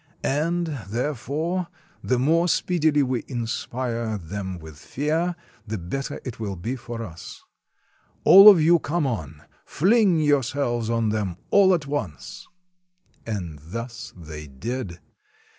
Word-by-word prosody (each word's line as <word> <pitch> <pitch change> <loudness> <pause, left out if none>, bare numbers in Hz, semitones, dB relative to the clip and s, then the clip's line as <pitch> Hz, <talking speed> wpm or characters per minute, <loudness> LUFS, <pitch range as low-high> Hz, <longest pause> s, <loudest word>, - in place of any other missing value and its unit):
And, 170 +5 0 0.2
there 125 +8 -1
fore, 160 +8 -3 0.4
the 125 - +1
more 165 +7 +3
speedily 155 -4 +2
we 125 -2 -1
inspire 115 -2 -3
them 95 +1 -5
with 80 -2 -12
fear, 160 - -1 0.3
the 110 +1 -3
better 135 - -4
it 125 -4 -6
will 100 -3 -3
be 115 +9 -4
for 120 -2 -6
us. 85 -5 -10 0.8
All 195 +2 +10
of 195 -5 +7
you 165 +2 +5
come 155 +1 -1
on! 80 - -4 0.2
Fling 195 0 +3
your 145 -2 +3
selves 120 -3 -2
on 115 -2 +1
them 105 -5 -2
all 195 -2 +6
at 155 -4 -4
once!" 95 - -5 0.8
And 90 -9 -4
thus 115 - -7
they 75 -3 -9
did. 90 - -5
120 Hz, 135 wpm, -24 LUFS, 100-155 Hz, 0.8 s, All